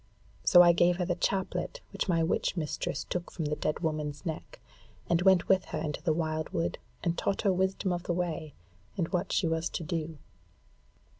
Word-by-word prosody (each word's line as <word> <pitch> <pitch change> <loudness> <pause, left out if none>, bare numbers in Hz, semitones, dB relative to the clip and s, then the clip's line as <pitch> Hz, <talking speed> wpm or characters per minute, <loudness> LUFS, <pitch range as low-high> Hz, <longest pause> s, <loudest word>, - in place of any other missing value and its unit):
So 175 -1 +8
I 175 - +7
gave 175 +1 +4
her 180 - 0
the 175 - +1
chaplet 190 - -1
which - - -2
my 165 -2 +3
witch 170 +2 0
mistress 150 -2 -2
took 175 -1 -4
from 165 - -4
the 150 +1 0
dead 155 - -2
woman's 150 -3 -2
neck; 160 -2 -5 0.5
and 170 0 +2
went 190 -1 +5
with 190 -1 +3
her 160 - -4
into 155 -1 -3
the 170 - +1
wildwood, 155 +1 -1 0.2
and 170 -1 +1
taught 200 - -1
her 195 -3 +4
wisdom 190 0 0
of 175 - -2
the 175 - 0
way 165 -4 -3 0.4
and 170 -3 0
what 180 0 -1
she 195 - +2
was 165 +1 0
to - - -4
do. 160 -1 -3
170 Hz, 195 wpm, -30 LUFS, 160-180 Hz, 0.5 s, So